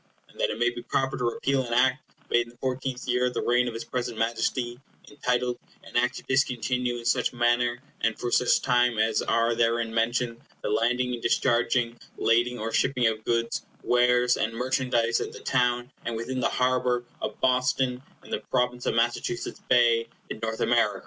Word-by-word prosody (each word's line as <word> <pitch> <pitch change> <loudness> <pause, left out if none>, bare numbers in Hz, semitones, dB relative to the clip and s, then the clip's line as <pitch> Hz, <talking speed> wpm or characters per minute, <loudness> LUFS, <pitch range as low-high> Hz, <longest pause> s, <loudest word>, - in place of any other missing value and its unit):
And - - -19
that - - +2
it - - -3
may 120 0 +3
be 120 0 -7
proper 135 +2 -1
to 125 - -3
repeal 130 +3 0
an 120 - -4
Act 130 +3 +3 0.3
made 120 0 +3
in - - -13
the - - -26
fourteenth 130 0 -3
year 125 0 +2
of 125 - -5
the - - -1
reign 125 +1 +2
of 115 - -4
his 115 - -4
present 120 -2 -4
Majesty, 120 +2 -1 0.3
entitled, 125 -3 -1 0.2
An - - -14
Act 125 +1 +2
to - - -8
discontinue, 125 -2 0
in 120 - -9
such 125 +1 +1
manner 120 0 +2 0.2
and 115 -1 +1
for 120 - -3
such 125 - +3
time 125 -2 +3
as 110 0 +2
are 115 0 +2
therein 115 0 +1
mentioned, 115 +1 0 0.2
the - - -1
landing 125 +3 +1
and 120 - -5
discharging, 120 0 +1 0.2
lading 120 +2 +2
or 115 0 -3
shipping 130 -1 +1
of 110 -1 0
goods, 115 0 0 0.2
wares, 125 0 +3
and 110 +1 -1
merchandise 120 -1 +1
at - - -5
the - - -9
town 125 0 0
and 115 - -3
within 125 +3 -3
the - - +1
harbor 125 -1 +1 0.2
of 105 - -4
Boston, 125 0 +1 0.2
in - - -14
the - - -1
Province 125 -1 0
of - - +1
Massachusetts 120 +10 -1
Bay, 120 -2 +4 0.2
in - - -5
North 110 0 -3
America. - - +2
120 Hz, 195 wpm, -26 LUFS, 115-125 Hz, 0.3 s, Bay